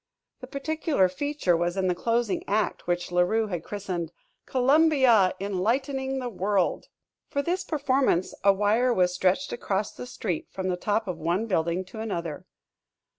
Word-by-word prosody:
The 255 - -9
particular 285 - +1
feature 240 -2 0
was 175 +2 -1
in 190 - +1
the 180 - +2
closing 230 +3 0
act 210 -2 -1
which 175 0 -1
La 180 0 +3
Rue 220 +5 +2
had 175 -6 -4
christened 185 -5 -4 0.4
"Columbia 260 - +4
Enlightening 265 +8 -1
the 255 -2 -3
World." 195 -3 0 0.4
For 280 - -1
this 360 +4 -1
performance 270 - +1
a 200 - +7
wire 210 +6 +2
was 180 -5 +2
stretched 190 +10 +1
across 200 -3 -2
the 250 - -8
street 195 -9 -3
from 190 -1 -3
the 180 - +1
top 210 +4 -1
of 175 -3 -4
one 170 +7 0
building 175 -2 0
to 220 +4 -10
another. 170 -8 -4
205 Hz, 160 wpm, -26 LUFS, 180-255 Hz, 0.4 s, a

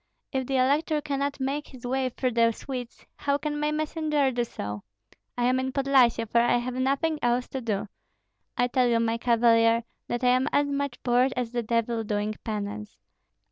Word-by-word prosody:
If 265 -2 -2
the 270 - -1
elector 295 +4 +2
cannot 285 -1 -2
make 275 +3 -2
his 255 -2 -12
way 260 +1 0
through 255 +1 -2
the 230 0 +3
Swedes, 250 -1 -7
how 280 0 0
can 295 0 -3
my 300 0 0
messenger 305 -2 0
do 240 -1 0
so? 105 - -6 0.6
I 245 - 0
am 255 +1 +3
in 260 0 -2
Podlyasye, 260 -4 +3
for 235 +2 +3
I 240 0 +3
have 245 +1 -3
nothing 275 +5 0
else 245 +1 +1
to 265 - -4
do. 215 -3 -2 0.7
I 245 - +3
tell 250 0 +2
you, 235 -1 +3
my 230 0 0
cavalier, 230 -1 +4 0.2
that 240 +1 -3
I 250 - +5
am 255 +2 +3
as 285 - +3
much 280 -2 -2
bored 250 +2 +3
as 245 -2 -2
the 240 -1 -1
devil 230 0 0
doing 210 0 -1
penance. 210 0 -5
250 Hz, 190 wpm, -26 LUFS, 230-275 Hz, 0.7 s, I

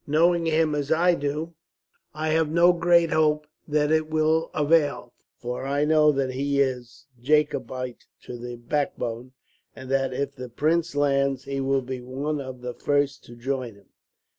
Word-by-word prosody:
Knowing 165 +3 +3
him 160 -1 +2
as 145 0 -2
I 175 +2 +4
do, 150 +2 -3 0.6
I 155 +1 -3
have 160 0 +2
no 170 +2 +5
great 170 -1 +3
hope 150 -1 +2 0.2
that 150 0 +1
it 155 0 +1
will 155 +1 +1
avail; 145 -5 +1 0.2
for 125 +2 -5
I 145 +2 +1
know 155 0 +5
that 135 -2 -1
he 140 +2 -1
is 130 0 -2 0.2
Jacobite 130 -3 -1 0.2
to 125 - -8
the 120 0 -7
backbone, 120 -1 -3 0.4
and 130 0 -9
that, 135 -1 +1
if 140 +2 -3
the 125 -2 -8
Prince 160 +6 0
lands, 140 -2 +1
he 135 0 -3
will 135 0 +1
be 130 0 -5
one 140 +4 -3
of 130 -2 -8
the 125 0 -5
first 145 +1 0
to 120 - -12
join 125 -2 -4
him." 100 -1 -22
145 Hz, 165 wpm, -25 LUFS, 130-155 Hz, 0.6 s, no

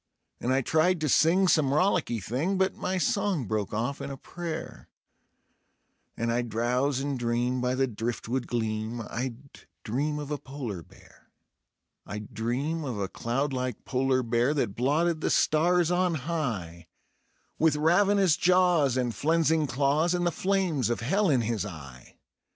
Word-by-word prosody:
And 125 - -1
I 135 +1 +3
tried 160 +6 +2
to 155 - +1
sing 175 +7 +4
some 155 -6 +3
rollicky 160 - +1
thing, 135 - -1
but 190 0 +2
my 185 +1 -2
song 185 - 0
broke 105 -1 -2
off 120 +6 -2
in - - -5
a 135 - -6
prayer, 170 +2 -7 1.3
And 115 0 -1
I'd 120 0 -1
drowse 125 +5 0
and 140 -1 -2
dream 120 +1 0
by 125 +1 0
the 135 +1 +2
driftwood 120 +2 -3
gleam; 110 0 -2
I'd 120 0 -4 0.5
dream 145 +7 -1
of 145 0 -6
a 150 - -2
polar 130 -9 -6
bear; - - -20 0.8
I'd 105 0 -7
dream 135 +8 -2
of 125 -6 -4
a 100 -1 -2
cloudlike 130 0 -2
polar 130 0 +1
bear 120 +5 +1
that 115 -9 -1
blotted 155 +6 +1
the - - 0
stars 170 +2 +3
on 180 -1 +2
high, 115 - -4 0.7
With 160 -1 +4
ravenous 180 +3 +3
jaws 175 -7 +3
and 125 -2 0
flenzing 160 +4 +2
claws, 145 +6 +1
and 175 0 0
the 175 - +2
flames 185 - 0
of 120 - -1
hell 195 - +1
in 130 -5 +3
his 115 -2 -1
eye. 70 -10 -10
135 Hz, 155 wpm, -27 LUFS, 120-165 Hz, 1.3 s, sing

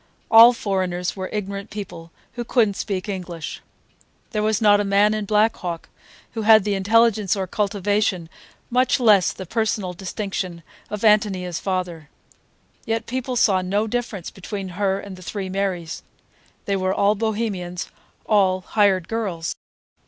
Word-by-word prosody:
All 230 +2 +10
foreigners 185 -6 -2
were 185 -1 -5
ignorant 200 0 -4
people 195 -5 -8 0.2
who 240 0 -4
could 230 -2 +2
n't 200 - -6
speak 190 -1 -3
English. 180 -5 -5 0.7
There 215 - -1
was 215 -1 +1
not 205 -2 +5
a - - +1
man 200 +1 +3
in 215 -1 -2
Black 215 +2 +3
Hawk 170 -2 -5 0.4
who 225 - -4
had 215 -1 +6
the 205 0 0
intelligence 210 0 +3
or 195 -1 -2
cultivation, 205 -2 0 0.4
much 255 +2 +2
less 210 -7 +5
the 190 - -8
personal 210 -2 -1
distinction, 185 -2 -5 0.3
of 210 -1 -5
Ántonia's 200 -5 +2
father. 180 -5 -3 0.7
Yet 225 0 -2
people 255 0 -3
saw 195 -5 +3
no 200 +4 0
difference 220 -5 -4
between 195 0 -6
her 195 +1 -1
and 200 -2 -9
the - - -13
three 190 +2 -5
Marys; 185 -4 -3 0.6
they 200 - 0
were 185 0 0
all 200 +1 +3
Bohemians, 205 -5 -3 0.3
all 190 -3 +3
"hired 190 -2 +2
girls." 195 -8 -3
200 Hz, 150 wpm, -22 LUFS, 185-215 Hz, 0.7 s, All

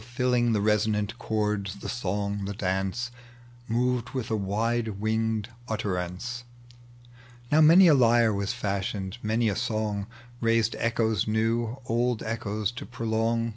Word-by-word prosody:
Filling 125 -2 +2
the 105 -2 +1
reaonaot 105 +1 +1
chords, 105 -3 -1
the 100 - -8
song, 100 -2 -2
the 100 +1 -4
dance, 95 +5 -2 0.6
Moved 125 +2 0
with 120 -3 -3
a - - +2
wider 110 +3 0
winged 110 +1 -1 0.2
utterance. 105 +2 -3 1.1
Now 155 +2 +5
many 170 +4 +8
a 160 - +7
IjTe 120 -4 +4
was 100 +1 -1
fashioned, 100 -2 -3
many 110 +2 +1
a 100 - +1
song 110 -3 -2 0.3
liaised 115 -1 +2
echoes 110 -3 +1
new, 115 +2 0
old 120 -1 0
echoes 110 -1 -2
to 120 - -8
prolong. 115 0 0
110 Hz, 135 wpm, -27 LUFS, 105-120 Hz, 1.1 s, many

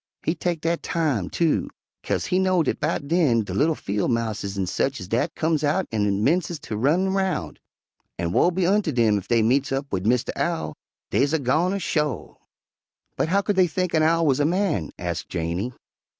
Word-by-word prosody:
He 160 - +1
teck 175 -1 -2
dat 165 +1 0
time, 145 - -1
too, 165 -3 +1 0.3
'kase - - -1
he 185 - +1
know 185 -2 +3
dat - - -1
'bout 140 - -1
den 145 -9 +3
de - - -6
li'l 155 +2 +2
fiel' 100 -4 -2
mouses 110 -4 -2
an' 95 - 0
sech 135 +9 -1
ez 90 - -7
dat 115 +5 -1
comes 160 -2 0
out 155 +6 +1
an' 105 -2 0
'mences 170 +4 +1
ter 110 - -6
run 155 - +2
roun', 190 -1 -1 0.6
an' 85 0 -2
woe 170 - +4
be 180 0 0
unter 195 -2 +2
'em 110 -3 +4
ef 95 - -12
dey 115 -2 +3
meets 135 +5 +2
up 135 +1 -1
wid 95 +1 -1
Mistah 125 +1 +1
Owl; 170 -1 -2 0.4
deys 140 +3 +2
a 160 - +2
goner, 160 +9 +1
sho'." 150 - -2 0.8
"But - - 0
how 200 +3 +3
could 205 -1 -1
they 185 -1 +5
think 180 +1 -2
an 160 - +3
owl 165 +1 +3
was 140 -2 +2
a - - +3
man?" 170 - 0
asked 85 -1 -4
Janey. 85 +7 -2
150 Hz, 200 wpm, -24 LUFS, 110-170 Hz, 0.8 s, they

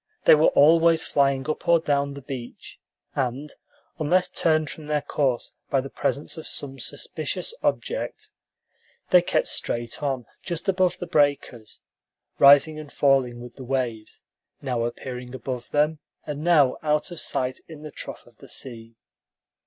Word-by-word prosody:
They - - +9
were 155 +1 +5
always 165 +2 +5
flying 135 -1 +1
up 155 +3 -3
or 170 -1 +6
down 140 -2 0
the 140 - -9
beach, 125 -3 -8 0.3
and, 135 +3 -3 0.5
unless 180 +4 +2
turned 155 -1 +1
from 155 -2 -10
their 150 -1 0
course 135 -4 -1 0.2
by 135 - +2
the 135 +1 -6
presence 150 +3 -2
of 160 - -7
some 135 -1 -5
suspicious 470 - -4
object, - - -2 0.8
they 180 - +8
kept 175 - 0
straight 120 0 -2
on 135 -4 -2 0.2
just 175 +1 -5
above 185 -2 +2
the - - -5
breakers, 145 -9 0 0.6
rising 145 +3 +7
and 150 -2 -10
falling 130 -4 +2
with 120 0 -11
the 135 - -8
waves; 120 -4 -3 0.4
now 125 -4 -1
appearing 125 +1 -6
above 125 -1 -5
them, 150 +1 +1 0.3
and 150 0 -5
now 155 -6 +4
out 150 +3 0
of 175 - -4
sight 130 0 -1
in 155 -2 -11
the 155 - -8
trough - - -7
of - - -22
the - - -15
sea. 115 -3 -6
140 Hz, 155 wpm, -25 LUFS, 130-155 Hz, 0.8 s, They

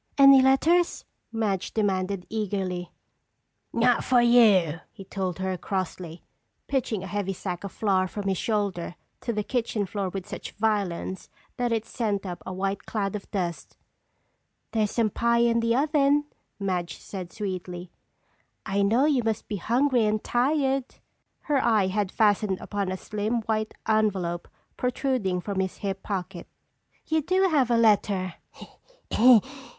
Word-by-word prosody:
"Any 275 -1 +8
letters?" 325 +7 +3 0.3
Madge 210 -5 -2
demanded 195 -3 0
eagerly. 190 -4 -3 0.8
"Not 240 +1 +3
for 250 -2 +4
you," 210 -10 +5
he 195 - -11
told 185 -3 -3
her 190 0 -2
crossly, 180 -3 -4 0.4
pitching 235 -7 -1
a - - -5
heavy 195 0 -2
sack 180 -1 -5
of 200 - -5
flour 190 -3 +1
from 200 +1 -5
his 190 -2 0
shoulder 200 -6 -1 0.2
to 235 - -3
the 210 -2 -2
kitchen 225 -3 -1
floor 195 0 -3
with 190 0 -6
such - - -7
violence 200 -4 -2 0.3
that 245 -1 0
it 225 -1 0
sent 205 -5 -2
up 180 -2 -6
a - - -3
white 195 +1 -3
cloud 200 -2 -2
of 205 - -7
dust. 175 -4 -4 0.9
"There's 215 -2 +1
some 225 -1 +1
pie 235 +2 +2
in 235 0 +3
the 230 0 +1
oven," 290 +1 +3 0.3
Madge 180 -4 -2
said 185 -3 -8
sweetly. 180 -3 -5 0.7
"I 200 +1 0
know 225 +7 +3
you 285 -5 +3
must 225 -1 -2
be 210 - -3
hungry 245 +4 +2
and 210 0 0
tired." 270 +1 0 0.5
Her 285 -3 +1
eye 215 -4 +3
had 200 0 -1
fastened 205 -3 +2
upon 200 -2 -3
a 185 - -3
slim, 215 +4 -2
white 215 0 -2
envelope 195 -6 0 0.3
protruding 250 -7 -1
from 200 0 -3
his 190 -1 -2
hip 195 -1 -4
pocket. 185 -3 -5 0.6
"You 315 0 +1
do 370 +5 +2
have 275 -7 +2
a 235 - +3
letter!" 205 -5 +2
205 Hz, 145 wpm, -26 LUFS, 190-235 Hz, 0.9 s, Any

